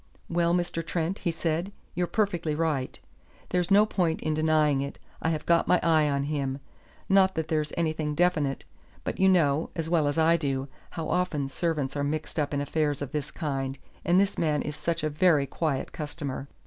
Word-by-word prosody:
"Well, 170 Hz, 0 st, +2 dB
Mr. 175 Hz, -2 st, -1 dB
Trent," 165 Hz, +3 st, -2 dB
he 175 Hz, -, -1 dB
said, 165 Hz, +3 st, -1 dB, 0.2 s
"you're 175 Hz, 0 st, 0 dB
perfectly 175 Hz, -8 st, 0 dB
right. 150 Hz, -5 st, -1 dB, 0.5 s
There's 180 Hz, -1 st, 0 dB
no 205 Hz, +2 st, +6 dB
point 175 Hz, -6 st, 0 dB
in 155 Hz, -, 0 dB
denying 155 Hz, -2 st, +3 dB
it. 140 Hz, 0 st, -5 dB, 0.2 s
I 160 Hz, -, +1 dB
have 155 Hz, -2 st, -2 dB
got 170 Hz, -1 st, +3 dB
my 180 Hz, -, +4 dB
eye 155 Hz, -3 st, +4 dB
on 140 Hz, -1 st, 0 dB
him. 140 Hz, -2 st, -2 dB, 0.5 s
Not 190 Hz, -1 st, +4 dB
that 160 Hz, -1 st, -2 dB
there's 155 Hz, -2 st, 0 dB
anything 155 Hz, -2 st, -1 dB
definite; 155 Hz, -5 st, +1 dB, 0.4 s
but -, -, -4 dB
you 190 Hz, 0 st, +5 dB
know, 160 Hz, -4 st, +3 dB
as 165 Hz, 0 st, -3 dB
well 160 Hz, -4 st, +3 dB
as 145 Hz, -, -1 dB
I 165 Hz, +1 st, +5 dB
do, 135 Hz, -3 st, -2 dB, 0.2 s
how 165 Hz, -2 st, -5 dB
often 165 Hz, -6 st, 0 dB
servants 150 Hz, -2 st, -1 dB
are 145 Hz, -, -1 dB
mixed 155 Hz, +2 st, -2 dB
up 145 Hz, -, 0 dB
in 145 Hz, -1 st, 0 dB
affairs 145 Hz, 0 st, 0 dB
of 135 Hz, -, -6 dB
this 150 Hz, -2 st, -3 dB
kind, 135 Hz, -4 st, -3 dB, 0.3 s
and 175 Hz, +2 st, +4 dB
this 200 Hz, 0 st, +1 dB
man 150 Hz, -3 st, +1 dB
is 150 Hz, -, -4 dB
such 170 Hz, 0 st, -2 dB
a 155 Hz, -, +1 dB
very 150 Hz, -2 st, +4 dB
quiet 145 Hz, -1 st, -2 dB
customer. 145 Hz, -3 st, -5 dB
155 Hz, 195 wpm, -27 LUFS, 145-170 Hz, 0.5 s, no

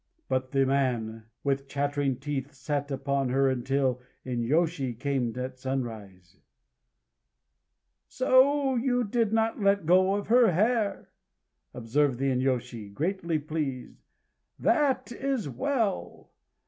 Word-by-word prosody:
But 130 Hz, 0 st, -1 dB
the 135 Hz, 0 st, +2 dB
man, 120 Hz, -5 st, -1 dB, 0.2 s
with 140 Hz, 0 st, -1 dB
chattering 145 Hz, -1 st, -1 dB
teeth, 140 Hz, 0 st, -4 dB
sat 145 Hz, +1 st, -3 dB
upon 140 Hz, -1 st, -1 dB
her 135 Hz, +2 st, +2 dB
until 130 Hz, 0 st, 0 dB, 0.2 s
the 125 Hz, -1 st, -4 dB
inyôshi 135 Hz, 0 st, 0 dB
came 130 Hz, -3 st, 0 dB
at 130 Hz, 0 st, -5 dB
sunrise. 110 Hz, -9 st, -5 dB, 1.7 s
"So 270 Hz, +2 st, +3 dB
you 245 Hz, 0 st, +1 dB
did 225 Hz, 0 st, 0 dB
not 225 Hz, 0 st, 0 dB
let 200 Hz, -2 st, +2 dB
go 185 Hz, +3 st, +4 dB
of 205 Hz, -, -3 dB
her 235 Hz, -4 st, +5 dB
hair!" 215 Hz, +3 st, 0 dB, 0.6 s
observed 125 Hz, +3 st, 0 dB
the 135 Hz, +1 st, 0 dB
inyôshi, 125 Hz, -4 st, -2 dB
greatly 170 Hz, -, -1 dB
pleased. 150 Hz, -4 st, -4 dB, 0.6 s
"That 270 Hz, -6 st, +1 dB
is 265 Hz, -, -2 dB
well 205 Hz, -, -2 dB
140 Hz, 115 wpm, -28 LUFS, 130-200 Hz, 1.7 s, her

